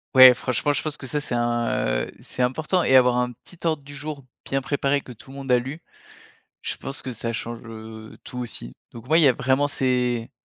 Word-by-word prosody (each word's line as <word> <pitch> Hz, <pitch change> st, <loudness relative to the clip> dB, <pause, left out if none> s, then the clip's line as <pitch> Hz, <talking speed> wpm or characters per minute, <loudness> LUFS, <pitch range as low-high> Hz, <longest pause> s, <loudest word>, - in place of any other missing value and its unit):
ouais, 130 Hz, -1 st, +11 dB
franchement, 130 Hz, +4 st, 0 dB
je 140 Hz, -, -1 dB
pense 155 Hz, -1 st, -3 dB
que -, -, -8 dB
ça, 140 Hz, +3 st, -1 dB
c'est 145 Hz, -4 st, -3 dB
un, 120 Hz, -, 0 dB
heu, -, -, -11 dB
c'est -, -, -6 dB
important 155 Hz, +8 st, +1 dB
et 130 Hz, -, +4 dB
avoir 125 Hz, -1 st, +6 dB
un 125 Hz, 0 st, 0 dB
petit 165 Hz, +8 st, -11 dB
ordre 160 Hz, -4 st, 0 dB
du 145 Hz, +1 st, -11 dB
jour 145 Hz, -1 st, -6 dB, 0.2 s
bien 135 Hz, -, -1 dB
préparé 140 Hz, +1 st, 0 dB
que 130 Hz, -, -11 dB
tout 120 Hz, +2 st, -14 dB
le 135 Hz, -, -10 dB
monde 135 Hz, -2 st, -4 dB
a 125 Hz, -, +6 dB
lu. 140 Hz, +7 st, -7 dB, 0.8 s
Je -, -, -2 dB
pense 135 Hz, -, -5 dB
que 130 Hz, -, -5 dB
ça 115 Hz, 0 st, -3 dB
change, 115 Hz, +1 st, -5 dB
heu, 110 Hz, -1 st, -10 dB
tout, 125 Hz, -, -8 dB
aussi. 115 Hz, -, -5 dB, 0.2 s
Donc, 115 Hz, 0 st, -11 dB
ouais, 160 Hz, -, +6 dB
il -, -, +5 dB
y 140 Hz, -, +8 dB
a 125 Hz, -, +4 dB
vraiment, 135 Hz, +3 st, +2 dB
c'est 125 Hz, -3 st, 0 dB
130 Hz, 235 wpm, -24 LUFS, 120-140 Hz, 0.8 s, ouais